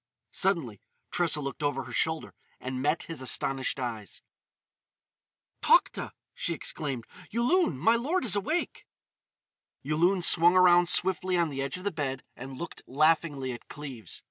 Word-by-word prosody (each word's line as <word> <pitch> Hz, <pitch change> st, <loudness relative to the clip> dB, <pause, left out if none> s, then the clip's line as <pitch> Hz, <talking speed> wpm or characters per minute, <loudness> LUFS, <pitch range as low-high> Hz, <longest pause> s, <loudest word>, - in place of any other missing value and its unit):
Suddenly 165 Hz, -, -1 dB, 0.3 s
Tressa 165 Hz, -4 st, +1 dB
looked 140 Hz, +1 st, -6 dB
over 145 Hz, -2 st, -1 dB
her 125 Hz, -, -11 dB
shoulder 160 Hz, +6 st, -1 dB, 0.3 s
and 130 Hz, 0 st, -5 dB
met 150 Hz, +4 st, 0 dB
his 165 Hz, -5 st, -7 dB
astonished 135 Hz, +1 st, 0 dB
eyes. 115 Hz, -6 st, -6 dB, 1.4 s
"Tokhta!" -, -, +2 dB, 0.2 s
she -, -, -3 dB
exclaimed. 135 Hz, -6 st, -4 dB, 0.2 s
"Yulun! 240 Hz, -, +1 dB
My 225 Hz, -, +3 dB
lord 300 Hz, +8 st, -1 dB
is 205 Hz, -5 st, +5 dB
awake!" 305 Hz, -, -2 dB, 1.0 s
Yulun 170 Hz, +6 st, +1 dB
swung 175 Hz, +1 st, +6 dB
around 175 Hz, -1 st, +6 dB
swiftly 185 Hz, 0 st, +2 dB
on 170 Hz, -2 st, +1 dB
the 135 Hz, -1 st, -4 dB
edge 140 Hz, +5 st, -3 dB
of 180 Hz, -, -10 dB
the 205 Hz, -, -1 dB
bed 135 Hz, -4 st, -4 dB
and 130 Hz, +1 st, -9 dB
looked 170 Hz, -, -7 dB
laughingly 145 Hz, -2 st, +1 dB
at 120 Hz, -, -11 dB
Cleves. 130 Hz, -, -8 dB
155 Hz, 145 wpm, -28 LUFS, 130-180 Hz, 1.4 s, swung